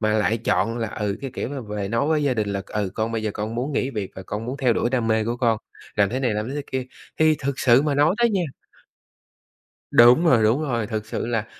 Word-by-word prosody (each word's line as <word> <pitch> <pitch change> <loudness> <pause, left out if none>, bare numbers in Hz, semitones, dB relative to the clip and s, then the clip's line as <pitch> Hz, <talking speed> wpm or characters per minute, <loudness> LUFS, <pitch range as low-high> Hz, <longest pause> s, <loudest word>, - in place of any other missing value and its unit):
mà 110 -1 +1
lại 110 +2 +1
chọn 115 +1 0
là, 115 - -2
ừ, 105 0 -3
cái 135 -2 -5
kiểu - - -3
là 135 - -4
về 105 -3 -4
nói 115 +7 0
với 155 -1 +2
gia 135 -3 +1
đình 105 -2 -1
là, 100 -1 -2
ừ, 105 -3 -2
con 110 +1 -2
bây 110 -1 -2
giờ 105 - -1
con 110 +2 -4
muốn 130 +5 -2
nghỉ 130 +1 0
việc 105 -6 -4
và 95 - -8
con 105 +4 -5
muốn 130 +3 -4
theo 125 -4 +2
đuổi 120 - 0
đam 120 -3 0
mê 110 -1 +2
của 120 +2 -2
con, 115 -3 +1 0.4
làm 100 -2 +4
thế 130 +2 -2
này 120 -5 0
làm 105 +3 -2
thế 140 - -5
thế 145 - -3
kia. 130 -1 -1 0.3
Thì 155 -1 +5
thực 140 0 -3
sự 125 +2 +5
mà 150 -2 0
nói 145 +5 +3
đấy 235 -1 +3
nha. 190 -3 +1 1.5
Đúng 120 +8 +7
rồi, 120 -9 +5
đúng 115 +7 +3
rồi. 120 -7 -1
Thực 110 0 -4
sự 110 - -3
là 115 -2 -1
115 Hz, 270 wpm, -23 LUFS, 110-135 Hz, 1.5 s, Đúng